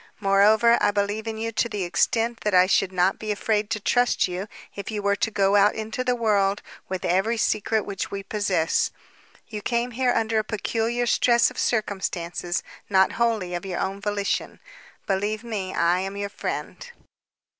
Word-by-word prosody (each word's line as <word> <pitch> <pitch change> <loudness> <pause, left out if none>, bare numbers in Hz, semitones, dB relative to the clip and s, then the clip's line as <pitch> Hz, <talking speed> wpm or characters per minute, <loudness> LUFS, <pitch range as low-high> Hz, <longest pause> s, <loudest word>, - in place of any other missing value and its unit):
Moreover, 215 +4 +4
I - - +4
believe 205 +2 -1
in 220 0 -3
you 225 +1 -3
to 235 +1 0
the 205 -3 -3
extent 225 +6 0
that 210 -3 0
I 180 0 +7
should 190 0 +2
not 185 +1 +1
be 215 -1 -3
afraid 210 0 0
to 225 -2 -1
trust 245 +2 +2
you 185 +3 -5 0.3
if 200 -1 -6
you 215 -2 -3
were 200 0 +1
to - - 0
go 200 -1 +2
out 205 0 +5
into 220 +3 -3
the 250 -1 +1
world 205 -4 +1 0.3
with 185 -1 -3
every 195 +6 +1
secret 215 0 0
which 200 -1 -4
we 200 0 -5
possess. 195 -6 0 0.6
You 210 -2 -6
came 235 +3 -1
here 250 +1 +1
under 225 -1 +1
a - - 0
peculiar 225 +3 -1
stress 235 0 +3
of - - -8
circumstances, 180 -5 -2 0.3
not 190 -1 +4
wholly 225 -6 0
of 175 - -3
your 185 -3 -4
own 195 +1 -3
volition. 205 -1 -2 0.5
Believe 205 +3 -1
me, 205 -5 -4
I 170 +2 +2
am 195 +1 -4
your 200 0 -3
friend." - - -5
205 Hz, 180 wpm, -24 LUFS, 195-225 Hz, 0.6 s, I